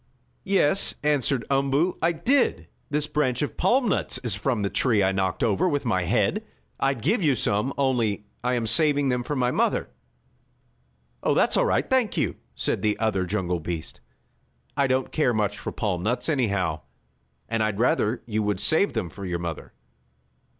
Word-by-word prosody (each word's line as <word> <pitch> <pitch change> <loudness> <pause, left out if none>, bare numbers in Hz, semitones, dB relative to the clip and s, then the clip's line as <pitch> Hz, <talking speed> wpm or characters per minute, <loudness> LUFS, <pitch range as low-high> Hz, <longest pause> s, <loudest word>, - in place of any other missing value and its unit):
"Yes," 195 -2 +3
answered 140 -4 +1
Umboo, 140 +6 +2
"I 165 - +3
did. 245 - +1 0.2
This 150 0 +1
branch 150 -4 0
of 145 - -4
palm 255 0 +2
nuts - - 0
is 120 -4 +1
from 105 +2 -1
the 100 - 0
tree 110 -6 +2
I 95 - +2
knocked 95 +1 -1
over 115 - +2
with 145 -3 -1
my 95 -7 +1
head. 110 - +1 0.4
I'd 135 -4 0
give 205 - +2
you 145 -6 +3
some, 105 +3 0
only 120 -7 0 0.2
I 125 0 +1
am 120 -2 -1
saving 145 +3 +3
them 125 -1 0
for 145 +4 -3
my 125 -2 +1
mother." - - 0 1.3
"Oh, - - +1
that's - - +3
all - - +3
right; - - +1
thank 260 -4 +1
you," - - 0 0.2
said - - -1
the 105 -1 +1
other 100 -5 0
jungle 90 -3 -1
beast. 80 0 -5 0.8
"I 140 -1 +2
don't 130 0 0
care 125 -7 +1
much 105 -1 -1
for - - -5
palm 95 -6 -2
nuts 120 - -1
anyhow, 100 - 0 0.7
and 115 0 -1
I'd 110 -2 0
rather 115 0 +1
you 110 -2 -1
would 105 -2 -1
save 160 - +2
them 90 - -2
for 100 +4 -10
your 90 -2 -2
mother." 85 -2 -6
120 Hz, 180 wpm, -25 LUFS, 105-145 Hz, 1.3 s, Yes